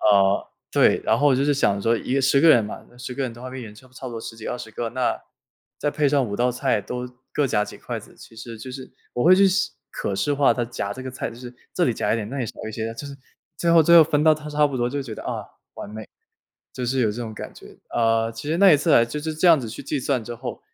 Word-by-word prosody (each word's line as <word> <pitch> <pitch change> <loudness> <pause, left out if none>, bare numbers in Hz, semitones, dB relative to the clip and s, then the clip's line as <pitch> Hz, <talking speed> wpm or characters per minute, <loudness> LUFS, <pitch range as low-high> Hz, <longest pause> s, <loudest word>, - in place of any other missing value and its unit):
呃， 100 -1 +3 0.2
对， - - +4
然 - - +2
后 145 - +3
我 135 - +3
就 135 - +1
是 145 - +3
想 100 -7 +1
说 115 +2 +3
一 130 +4 -1
10 140 +1 +3
个 165 - +6
人 120 -8 +6
嘛， 105 - -7
那 120 - -20
10 125 0 -6
个 140 - -2
人 130 - -2
的 120 +1 -13
话 130 0 -7
已 - - -6
经 105 -2 -10
差 120 +5 -16
不 - - -28
差 130 - -8
不 125 - -6
多 115 - -5
10 115 - -7
几， 110 - -9
20 120 -2 -5
个， 115 +1 -3
那 125 +1 -1 0.6
再 145 - 0
配 150 0 +1
上 140 -1 +2
5 100 - -4
道 125 +2 +2
菜 125 -2 0
都 125 +5 -5 0.3
各 145 - +2
夹 105 -5 +1
几 - - -10
筷 - - -5
子， - - -16
其 - - -15
实 115 0 -8
就 130 +4 -8
是 130 0 -8 0.2
我 120 - 0
会 180 +3 +7
去 195 +1 +6
视 195 +2 0 0.2
可 100 - -3
视 145 +9 0
化 140 0 +4
他 120 - -1
夹 110 -4 -4
这 130 - -8
个 130 - -5
菜， 130 - -4
就 115 - -12
是 125 0 -10 0.2
这 180 - +2
里 125 - +2
夹 - - 0
一 - - +1
点， 110 -2 -4
那 140 - -4
里 125 - -1
少 - - -7 0.2
一 - - -7
些 110 +1 -3
的， 115 - -5
就 145 - -7
是 140 - -8 0.4
最 170 - +1
后 170 0 +7
最 170 +2 +6
后 165 - +10
分 150 -1 +1
到 155 -1 +6
它 150 0 -8
差 150 0 +3
不 140 -2 -4
多， 120 -1 0
就 140 +2 -2
觉 120 -5 -7
得： - - -9
“啊， - - -4 0.3
完 - - -8
美！” 110 0 -8 0.7
就 125 - -4
是 130 +2 0
有 110 -3 +2
这 120 +3 -5
种 110 -2 -6
感 - - -8
觉。 - - -15
呃， 115 -1 +2
其 115 +5 -7
实 160 - +1
那 195 -1 +7
一 - - +7
次 145 - 0
来 115 - +6
就 135 +6 -5
是 160 +1 -3
这 160 +4 +1
样 165 -4 +6
子 120 - -5
去 110 - -8
计 140 +1 -2
算 130 -3 -1
之 120 +2 -6
后 125 +1 -7
125 Hz, 320 characters per minute, -23 LUFS, 115-145 Hz, 0.7 s, 后